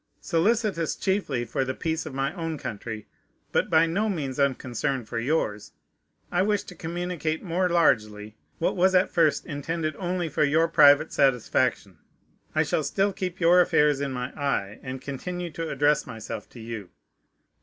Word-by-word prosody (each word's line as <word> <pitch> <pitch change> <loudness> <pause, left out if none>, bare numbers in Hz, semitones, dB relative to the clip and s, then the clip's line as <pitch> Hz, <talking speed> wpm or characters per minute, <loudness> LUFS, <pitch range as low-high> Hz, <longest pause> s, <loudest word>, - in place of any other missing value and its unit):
Solicitous 195 -1 +1
chiefly 190 -11 -1
for 135 - -1
the 130 0 -3
peace 160 -1 -2
of 150 - -7
my 135 0 -1
own 165 -2 -4
country, 110 -3 -6 0.5
but - - +1
by 160 +1 +5
no 200 +7 0
means 145 -8 -3
unconcerned 130 -2 -1
for 115 - -3
yours, 115 -6 -1 0.6
I 175 - +2
wish 205 +1 +1
to 180 - -11
communicate 165 -1 -3
more 180 0 0
largely 105 -11 +1 0.2
what 165 - 0
was 190 +1 +3
at 185 - +3
first 155 -4 +2
intended 155 +1 -3
only 180 -2 -2
for 150 - 0
your 155 +3 +3
private 150 -1 +5
satisfaction. 125 - +1 0.6
I - - +4
shall - - 0
still 195 +8 0
keep 185 -2 -4
your 175 +1 +6
affairs 150 -4 +3
in 140 -1 -2
my 125 0 -4
eye, 110 -8 -2
and 130 0 -6
continue 175 +6 -5
to 165 0 -4
address 145 +1 +2
myself 110 -3 -7
to 120 - -13
you. 110 -4 -7
150 Hz, 165 wpm, -26 LUFS, 130-175 Hz, 0.6 s, your